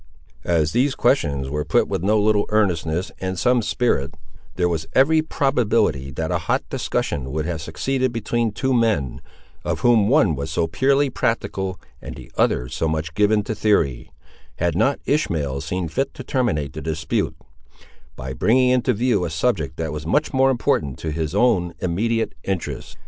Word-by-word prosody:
As 80 -3 +2
these 130 +4 +1
questions 70 - +1
were 75 +2 -2
put 75 - +2
with - - -2
no 105 +3 +2
little 105 0 +2
earnestness 90 -5 0
and 95 0 -3
some 125 +4 +3
spirit, 105 - 0 0.4
there 90 -1 +1
was 80 -2 -2
every 155 +4 +4
probability 115 - +1
that - - -3
a - - +1
hot - - 0
discussion 65 -2 -2
would 80 +1 -2
have 85 -2 -3
succeeded 130 - -1
between 115 0 -1
two 130 +5 -1
men, 110 - +1 0.4
of - - -2
whom 115 -4 +4
one 110 - +4
was 70 +3 -4
so 80 +1 0
purely 135 - +2
practical 95 -6 -2 0.2
and - - -8
the - - -12
other 60 - +1
so 80 - -2
much 80 0 -2
given 105 +2 +2
to 110 - -3
theory, 100 - +1 0.5
had 85 -1 0
not 135 +9 +2
Ishmael 75 - 0
seen 85 +4 -3
fit 135 - -2
to - - -7
terminate 75 - -1
the 80 - -6
dispute, 80 0 -2 0.8
by 65 +1 -6
bringing 125 - +3
into 125 0 +2
view 115 -3 +1
a 85 - -2
subject 80 -2 -1
that 80 -1 -3
was 75 +1 -6
much 150 - +1
more 135 0 +4
important 75 - 0
to 80 - -4
his 80 +2 -3
own 100 -7 +2
immediate 110 +7 -1
interests. 95 -3 -4
95 Hz, 170 wpm, -22 LUFS, 80-120 Hz, 0.8 s, every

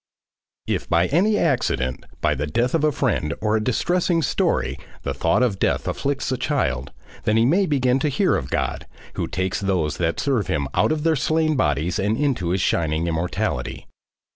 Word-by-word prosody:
If - - -2
by 85 +1 +3
any 205 +7 +3
accident, 65 - 0
by 75 - +2
the 75 +1 -3
death 120 +10 0
of 165 -2 +1
a 155 - +4
friend 110 - -1
or 105 0 +1
a 110 - 0
distressing 170 - +1
story, 65 - 0 0.2
the 70 - -2
thought 85 - +2
of 105 -7 0
death - - 0
afflicts 140 -2 -2
a 130 - 0
child, 70 - -1 0.3
then 110 - +3
he 115 - +4
may 185 +9 +3
begin 130 -3 +2
to 150 - +1
hear 185 +8 +2
of 65 - -3
God, - - -2 0.3
who - - -2
takes 95 0 -2
those 90 -6 0
that 85 -1 -1
serve 130 -8 0
him 70 -2 -1
out - - +2
of 155 -1 -1
their 165 -1 +3
slain 155 +2 +1
bodies 80 - 0
into 110 -2 0
his 95 +1 0
shining 80 -1 +1
immortality. 80 -6 -2
110 Hz, 185 wpm, -22 LUFS, -, 0.3 s, a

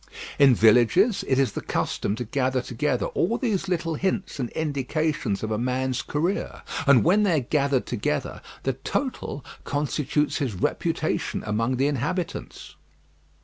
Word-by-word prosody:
In 135 -3 +7
villages 120 - +4
it 130 - +2
is 135 -1 +2
the - - -5
custom 100 - -1
to 125 - -4
gather 130 +1 0
together 125 -3 -1
all 230 +7 0
these 210 -7 -1
little 170 -3 -1
hints 190 +1 -2
and 125 -3 -2
indications 150 -5 -1
of 110 - -2
a 110 - 0
man's 130 +1 -1
career; 170 +7 -2 0.2
and 140 -4 +6
when 195 +6 +4
they 195 -5 +3
are 135 - 0
gathered 140 0 +1
together, 105 -10 -2 0.2
the 135 - 0
total 140 - -3 0.2
constitutes 150 0 0
his 125 -8 -2
reputation - - -1
among 115 +4 0
the 135 - +2
inhabitants. 150 +6 -3
140 Hz, 145 wpm, -25 LUFS, 125-160 Hz, 0.2 s, In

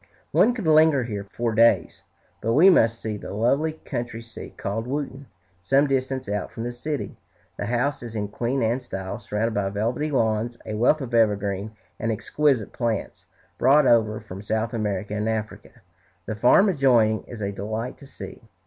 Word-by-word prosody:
One 245 +2 +4
could 220 -7 -5
linger 155 -3 +5
here 105 -4 -5
for 115 -1 -1
days, 115 +2 +3 0.4
but 115 +1 0
we 180 +8 +7
must 115 -9 +3
see 110 -2 -4
the 100 - -7
lovely 140 +9 +1
country 120 -6 -6
seat 115 - -11
called 110 +4 -3
"Wootton," 140 0 -4 0.3
some 135 +10 +3
distance 130 -1 -1
out 105 -1 -2
from 115 - -6
the 120 - -3
city. 145 +4 -5 0.4
The - - -3
house 125 +4 0
is 115 -2 -8
in 105 -1 -2
Queen 120 +4 -1
Anne 115 +3 +1
style, 95 -4 -6
surrounded 105 +2 -2
by 100 -2 0
velvety 115 +9 -1
lawns, 115 -3 0
a - - -5
wealth 120 +8 +3
of 125 -3 -6
evergreen 105 -2 +1 0.3
and 115 - -1
exquisite 125 +1 0
plants, 115 -4 -3 0.3
brought 140 +3 +5
over 110 -3 +3
from 100 -3 -9
South 110 +2 -2
America 105 -2 -2
and 105 +1 -1
Africa. 110 +1 -5 0.4
The 110 - -3
farm 120 - +5
adjoining 120 - +3
is 115 -3 -7
a 100 - -1
delight 110 +5 -5
to 140 - -13
see. - - -10
115 Hz, 175 wpm, -24 LUFS, 105-135 Hz, 0.4 s, we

